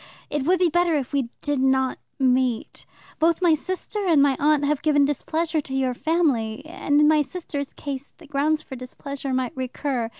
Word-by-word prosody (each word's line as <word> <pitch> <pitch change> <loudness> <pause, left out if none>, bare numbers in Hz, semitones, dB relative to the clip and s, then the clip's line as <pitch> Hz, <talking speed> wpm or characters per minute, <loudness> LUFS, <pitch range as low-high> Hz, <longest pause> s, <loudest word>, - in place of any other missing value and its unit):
It 290 -2 -1
would 365 +4 +4
be 360 0 +3
better 345 0 +2
if 275 -1 -2
we 270 -4 0
did 290 -2 -1
not 265 -1 +2 0.2
meet. 255 -3 0 0.3
Both 330 +1 +3
my 350 -3 +4
sister 370 +6 -3
and 325 -4 +5
my 280 -1 +4
aunt 295 0 +3
have 290 0 0
given 290 -2 +4
displeasure 315 +3 -1
to 265 -1 -6
your 260 -1 +1
family, 280 -6 0
and, 295 -2 0
in 300 - +6
my 305 -1 +5
sister's 290 -2 -5
case, 280 -1 -6
the 335 - -15
grounds 300 +2 0
for 265 - -8
displeasure 270 +2 -6
might 255 -2 -1
recur. 255 -2 -2
285 Hz, 190 wpm, -24 LUFS, 265-315 Hz, 0.3 s, in